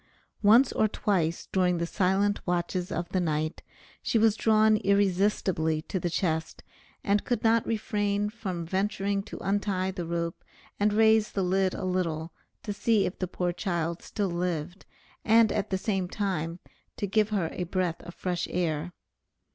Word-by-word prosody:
Once 230 +5 +6
or 215 - +2
twice, 175 -6 -1
during 180 -2 +2
the 170 - -1
silent 195 +3 +1
watches 175 +1 -1
of 170 +1 -2
the 185 - 0
night, 155 -2 -1 0.4
she - - +1
was 220 -1 +4
drawn 220 -1 +4
irresistibly 195 -5 +1
to 185 - -3
the 175 - -1
chest, 160 -2 -2 0.4
and 200 0 +2
could 245 - -1
not 230 0 +4
refrain 205 -2 0
from 195 -6 -5
venturing 200 +2 -1
to 200 - -9
untie 195 -2 0
the 180 -2 -5
rope 170 0 -3 0.4
and 205 +1 +3
raise 220 0 +4
the 195 - 0
lid 185 +1 +1
a - - -4
little, 165 -3 -2 0.3
to 205 - -3
see 215 0 +2
if 180 - -4
the 185 - -1
poor 175 0 -2
child 170 -3 -2
still 200 -3 -2
lived, 175 0 -3 0.4
and 225 0 +5
at 210 -1 -1
the 190 - 0
same 190 -2 -1
time 175 -5 -2 0.4
to - - -1
give 210 +2 +2
her 195 -7 -1
a 180 - -3
breath 180 -1 -1
of 175 0 -10
fresh 180 -1 -2
air. 170 -1 -2
190 Hz, 165 wpm, -28 LUFS, 175-205 Hz, 0.4 s, Once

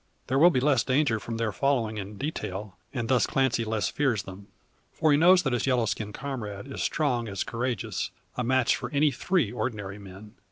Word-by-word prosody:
There 135 +2 +1
will 170 +4 +8
be 145 - +1
less 130 -2 +3
danger 130 -4 +2
from 115 +1 -5
their 115 -1 0
following 115 0 0
in 100 +1 -7
detail, 105 -9 -4 0.2
and 120 -4 -3
thus 125 0 +3
Clancy 130 -3 +1
less 110 -1 -1
fears 120 -8 0
them. 95 +1 -10 0.4
For 155 - +2
he 145 - +5
knows 180 +2 +6
that 135 -4 0
his 120 +2 0
yellow 125 -3 +2
skinned 105 -2 -3
comrade 120 -7 -5
is 140 - -6
strong 125 -7 0
as 95 -2 -2
courageous; 120 -2 -3 0.3
a 125 - -1
match 130 0 +3
for 125 - -5
any 145 +3 +3
three 135 - 0
ordinary 105 -4 -4
men. 100 +2 -12
120 Hz, 200 wpm, -27 LUFS, 105-135 Hz, 0.4 s, will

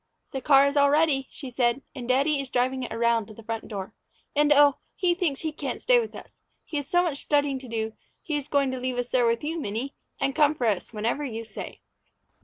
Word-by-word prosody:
"The 265 - -4
car 275 0 +6
is 280 +1 0
all 285 -1 +5
ready," 290 -3 +3
she 265 -3 -9
said, 245 +2 +1
"and 250 -3 -7
daddy 275 +3 +2
is 270 - -8
driving 255 +2 0
it 250 - -5
around 230 -1 +1
to 215 - -12
the 225 - -12
front 225 0 -4
door. 195 -3 -6 0.4
And 295 +1 +4
oh, 290 -1 +6 0.2
he 360 -2 +2
thinks 345 -6 -1
he 315 - -2
can't 300 - -4
stay - - +4
with 460 - -4
us. - - -13 0.2
He 305 - -4
has 285 0 -4
so 355 0 +4
much 305 -6 -2
studying 285 -2 +1
to 260 - -11
do 220 -1 -3 0.3
he 310 - -4
is 290 -1 -3
going 280 -2 +2
to 260 - -4
leave 255 0 -2
us 245 0 -2
there 245 -2 +3
with 230 +2 0
you, 325 +3 -2
Minnie, 235 +2 -3 0.3
and 275 0 0
come 300 +1 +4
for 250 - -2
us 205 -5 0
whenever 230 +6 -1
you 230 -5 -4
say." 215 - -8
270 Hz, 240 wpm, -26 LUFS, 235-290 Hz, 0.4 s, car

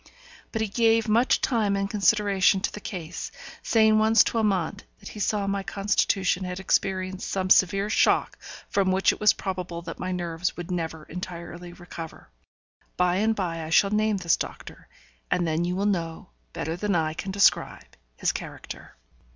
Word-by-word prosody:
But 220 -1 -1
he - - -1
gave 225 +1 +2
much 230 +4 +3
time 215 -5 +1
and 195 0 -1
consideration 200 -2 +3
to - - -1
the - - -6
case, 180 -5 -6 0.3
saying 220 -1 +4
once 220 +1 +5
to 230 - -1
Amante 200 -2 0
that - - -10
he 210 - -9
saw 205 0 0
my 195 0 -1
constitution 195 -1 0
had 180 0 -4
experienced 190 0 -1
some 185 -1 -1
severe 195 +2 +4
shock 215 - +2 0.3
from 195 -2 +1
which 190 +1 +3
it - - -10
was 210 -1 +5
probable 180 -3 -5
that 165 -1 -7
my 185 - -3
nerves 175 -1 -3
would 175 +1 -6
never 160 -3 -3
entirely 175 +1 -8
recover. 170 - -10 0.7
By 180 0 +2
and 220 +2 +2
by 170 -5 -3
I 155 - -6
shall 195 +5 +4
name 215 0 +1
this 170 -3 +2
doctor, - - -8 0.4
and 175 - +1
then 160 +1 0
you 180 +1 -1
will 195 +2 -1
know, 165 - -2 0.2
better 160 - -3
than 200 +2 -1
I 155 -2 0
can 190 - -6
describe, 200 +1 +1 0.2
his - - 0
character. - - -9
190 Hz, 175 wpm, -26 LUFS, 175-205 Hz, 0.7 s, once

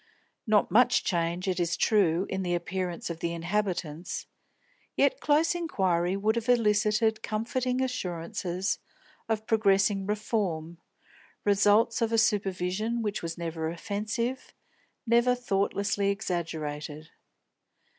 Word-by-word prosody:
Not 215 -1 +3
much 245 +2 +4
change, 175 +1 -1
it 185 -1 0
is 170 -1 0
true, 190 -4 +3
in 190 - -3
the 175 -1 0
appearance 175 0 -3
of 165 - -7
the 170 0 -2
inhabitants; 175 -2 -2 0.7
yet - - +3
close 305 +3 +3
inquiry 190 - 0
would 215 +3 +1
have 235 +1 -3
elicited 220 -1 +3
comforting 250 +4 -1
assurances 185 -5 -2 0.5
of 220 -1 -1
progressing 195 -2 +2
reform, 190 -6 -2 0.7
results 205 +3 +4
of 230 -1 +1
a 230 - +2
supervision 210 +1 0
which 205 -2 -2
was 165 -1 -5
never 165 -1 -3
offensive, 210 +8 -3 0.5
never 240 +1 +4
thoughtlessly 200 -3 0
exaggerated. 160 -6 -4
200 Hz, 115 wpm, -28 LUFS, 175-220 Hz, 0.7 s, much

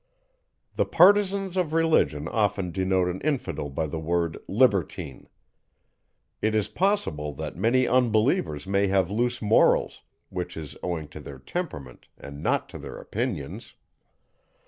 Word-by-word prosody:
_ - - -35
The - - +3
partisans 195 +1 +4
of 170 -4 0
Religion 160 - +2
often 100 -4 0
denote 95 0 +1
an 90 +1 -4
infidel 135 - -2
by 70 +3 -2
the 80 +1 -4
word 85 0 -1
libertine. 100 - 0 1.1
It 110 0 +1
is 105 -2 +1
possible 175 - 0
that 80 +1 -6
many 120 +7 +2
unbelievers 110 - +2
may 100 +1 +1
have 95 -1 +1
loose 120 +2 -1
morals, 105 +1 +3 0.3
which 90 -2 -5
is 75 -3 -7
owing 85 -4 -3
to 75 - -10
their 70 -2 -9
temperament, 70 - -6
and 70 0 -10
not - - 0
to - - -9
their - - -8
opinions. - - -4
95 Hz, 140 wpm, -26 LUFS, 80-130 Hz, 1.1 s, partisans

